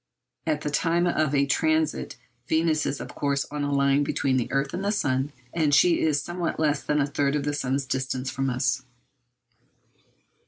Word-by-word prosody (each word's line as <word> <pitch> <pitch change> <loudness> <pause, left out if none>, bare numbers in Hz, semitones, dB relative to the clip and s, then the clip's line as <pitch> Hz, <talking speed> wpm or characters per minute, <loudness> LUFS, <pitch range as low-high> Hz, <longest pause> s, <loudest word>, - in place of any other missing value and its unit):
At 155 -2 0
the 150 - -3
time 170 +3 +2
of 155 -4 +1
a 140 0 +3
transit 155 +2 0 0.3
Venus 160 0 +1
is 135 - -2
of - - -7
course 140 -1 0
on 145 -1 -3
a 145 - -1
line 140 0 +3
between 135 -2 0
the 120 - -2
earth 135 0 0
and 185 +2 -3
the 200 - +1
sun, 135 -7 0 0.2
and 155 -4 +3
she 175 +2 +5
is 155 -2 +2
at 140 - -2
somewhat 175 -2 -3
less 150 -2 +1
than 150 0 0
a 140 - +3
third 140 0 0
of 145 - -1
the 145 0 -1
sun's 135 -1 -1
distance 130 0 -2
from 135 0 -1
us. 125 +1 0
145 Hz, 195 wpm, -26 LUFS, 135-155 Hz, 0.3 s, she